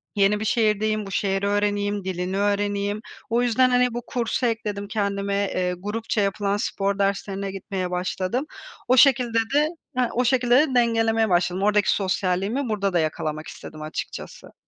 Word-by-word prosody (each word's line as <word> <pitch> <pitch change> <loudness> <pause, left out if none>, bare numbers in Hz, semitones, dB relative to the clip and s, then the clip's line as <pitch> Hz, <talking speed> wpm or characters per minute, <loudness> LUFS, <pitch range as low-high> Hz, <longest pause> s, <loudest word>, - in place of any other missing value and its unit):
yeni 205 +1 +3
bir 220 - -3
şehirdeyim, 215 -1 +1
bu 195 - -8
şehri 195 +1 0
öğreneyim, 205 0 0
dilini 185 +1 -3
öğreneyim. 205 0 0 0.3
O 235 +1 +2
yüzden, 255 +2 +3
hani, 250 -1 +2
bu 240 - -3
kursu 245 +1 -1
ekledim 210 -3 -2
kendime, 200 -2 -1 0.2
eee, 180 0 0
grupça 210 +2 -2
yapılan 200 0 0
spor 200 -1 -1
derslerine 195 0 -1
gitmeye 190 -1 -4
başladım. 185 +8 -2 0.4
O 255 +1 +4
şekilde 250 -3 +5 0.2
de 295 +2 +4 0.3
ha, 245 -2 +2
o 250 +1 +1
şekilde 245 0 +3
de, 270 -1 +3
dengelemeye 225 -2 +2
başladım. 180 +1 +1
Oradaki 210 -1 +3
sosyalliğimi 195 +6 -1
burada 200 -3 -1
da 175 - +3
yakalamak 155 0 -2
istedim 155 - -10
açıkçası. 155 +1 -7
205 Hz, 155 wpm, -24 LUFS, 195-230 Hz, 0.4 s, şekilde